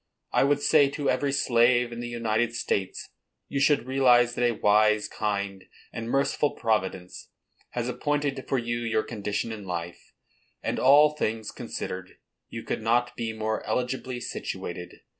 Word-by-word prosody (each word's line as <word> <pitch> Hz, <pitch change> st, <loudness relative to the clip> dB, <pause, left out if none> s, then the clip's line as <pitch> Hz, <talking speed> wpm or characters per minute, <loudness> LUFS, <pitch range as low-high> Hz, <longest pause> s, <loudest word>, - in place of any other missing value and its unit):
I -, -, +3 dB
would 145 Hz, 0 st, +2 dB
say 145 Hz, -3 st, +5 dB
to 145 Hz, 0 st, -1 dB
every 140 Hz, -1 st, 0 dB
slave 120 Hz, -2 st, +3 dB
in 120 Hz, -, -6 dB
the 120 Hz, -, -4 dB
United 115 Hz, 0 st, -1 dB
States, 95 Hz, -5 st, -2 dB, 0.4 s
"You 140 Hz, -, -2 dB
should 145 Hz, -2 st, +3 dB
realize 125 Hz, -2 st, +4 dB
that 125 Hz, -, -1 dB
a -, -, 0 dB
wise, 105 Hz, +1 st, +3 dB
kind, 100 Hz, -2 st, -3 dB, 0.3 s
and 115 Hz, 0 st, -5 dB
merciful 140 Hz, +2 st, +1 dB
Providence 95 Hz, -5 st, -2 dB, 0.4 s
has -, -, -2 dB
appointed 145 Hz, -2 st, -1 dB
for 135 Hz, -, +1 dB
you 120 Hz, -1 st, -2 dB
your 115 Hz, -2 st, 0 dB
condition 105 Hz, 0 st, -3 dB
in 110 Hz, -2 st, -7 dB
life; 85 Hz, -2 st, -6 dB, 0.5 s
and, -, -, -1 dB
all 145 Hz, +3 st, +6 dB
things 110 Hz, -6 st, -2 dB
considered, 95 Hz, 0 st, -6 dB, 0.3 s
you 115 Hz, -, -7 dB
could -, -, -3 dB
not 120 Hz, +2 st, +1 dB
be 115 Hz, -1 st, -3 dB
more 110 Hz, 0 st, -2 dB
eligibly 125 Hz, 0 st, -2 dB
situated. 90 Hz, -6 st, -6 dB
120 Hz, 155 wpm, -27 LUFS, 105-130 Hz, 0.5 s, all